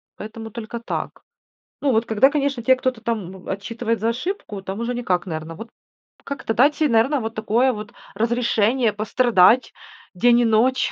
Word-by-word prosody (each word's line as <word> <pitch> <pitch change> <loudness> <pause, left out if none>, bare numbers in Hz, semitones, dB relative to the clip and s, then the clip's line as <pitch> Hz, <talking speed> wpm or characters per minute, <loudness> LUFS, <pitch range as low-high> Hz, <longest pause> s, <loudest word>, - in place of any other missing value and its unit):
поэтому 220 +1 -8
только 235 +1 -6
так. 230 - -5 0.6
Ну, 285 - +2
вот 225 0 +1
когда, 225 +5 +4
конечно, 280 -4 -1
те 260 +2 +5
кто-то 255 -2 -2
там 215 -6 -3
б - - -5
отчитывает 230 +3 -3
за 225 +3 0
ошибку, 240 - -4
там 195 +2 -5
уже 235 +1 -2
никак, 190 -7 -1
наверно. 160 -1 -5
Вот 225 +6 -9 0.5
как-то 275 -5 -4
дать 280 +6 +4
се, 310 - +2
наверно, 245 +5 +3
вот 225 0 -5
такое 230 +4 +1
вот 210 -1 -8 0.2
разрешение 230 +1 +1
пострадать 220 +1 +3 0.4
день 240 +5 +4
и - - +2
ночь. 230 +4 +2
230 Hz, 170 wpm, -22 LUFS, 215-255 Hz, 0.6 s, те